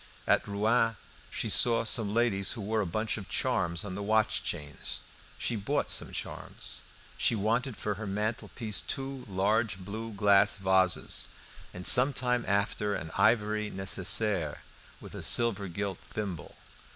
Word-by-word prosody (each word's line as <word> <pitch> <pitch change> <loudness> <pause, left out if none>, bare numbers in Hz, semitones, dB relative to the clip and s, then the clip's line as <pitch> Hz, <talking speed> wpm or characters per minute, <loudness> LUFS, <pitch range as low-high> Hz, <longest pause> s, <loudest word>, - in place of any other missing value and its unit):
At - - +2
Rouen 110 +3 +2 0.3
she - - -1
saw 115 -1 +3
some 110 -2 +2
ladies 105 -4 +1
who 115 - -6
wore 110 +2 0
a 100 - -2
bunch 110 +6 -1
of 100 - -10
charms 95 -7 0
on 100 - -5
the 100 - -5
watch 110 +1 +1
chains; 75 -1 -5 0.4
she 120 - -1
bought 135 +8 0
some - - +1
charms. - - -2 0.4
She - - +3
wanted 115 +4 0
for 105 - -2
her 105 - -4
mantelpiece 105 +1 -3
two 135 -1 -4
large 100 +1 +1
blue 110 +4 -6
glass 100 0 +4
vases, 95 -2 +1 0.4
and 90 0 -9
some 130 +3 +7
time 125 -2 +1
after 100 +1 0
an 80 -3 -6
ivory 105 0 +2
necessaire 95 -2 0 0.4
with - - -11
a - - -6
silver 110 -4 +3
gilt 95 +1 -4
thimble. 100 -7 -6
105 Hz, 150 wpm, -30 LUFS, 95-115 Hz, 0.4 s, some